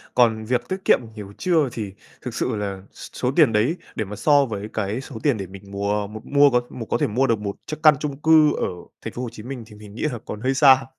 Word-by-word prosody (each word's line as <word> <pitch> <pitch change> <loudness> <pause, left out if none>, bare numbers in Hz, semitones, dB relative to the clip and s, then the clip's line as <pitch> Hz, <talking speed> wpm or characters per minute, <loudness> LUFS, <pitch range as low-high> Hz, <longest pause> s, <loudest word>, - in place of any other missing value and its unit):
còn 110 -3 +3
việc 125 +1 -1
tiết 190 - -1
kiệm - - +6
được 115 - -11
nhiều 100 -1 -8
chưa 160 -7 +2
thì 105 -4 -5 0.3
thực - - -6
sự - - -1
là 100 -2 -4
s - - -11
số 125 0 0
tiền 145 -9 +5
đấy 120 +11 +2 0.2
để 110 - -2
mà 105 +2 -7
so 145 -1 +4
với 105 -2 -5
cái 110 +4 -2
số 135 - -11
tiền 140 -7 +2
để 95 -2 -5
mình 95 +1 -12
mùa 100 +1 -1
m 110 +1 -8
mua 145 0 +5
có 125 -1 +2
một 115 - -7
có - - +1
thể - - +1
mua 130 +6 +1
được 115 -2 +1
một 100 -1 -4
chiếc 155 - -5
căn 155 -2 +8
chung 140 -3 -4
cư 155 -2 +5
ở - - -1 0.3
Thành - - -6
phố 125 - -5
Hồ 120 - -3
Chí 110 -2 -10
Minh 125 -2 -6
thì 105 -1 -14
mình 105 0 -13
nghĩ - - -7
là 120 - -5
còn 105 +1 -6
hơi 130 +2 +1
xa. 135 -1 +6
115 Hz, 280 wpm, -23 LUFS, 105-135 Hz, 0.3 s, căn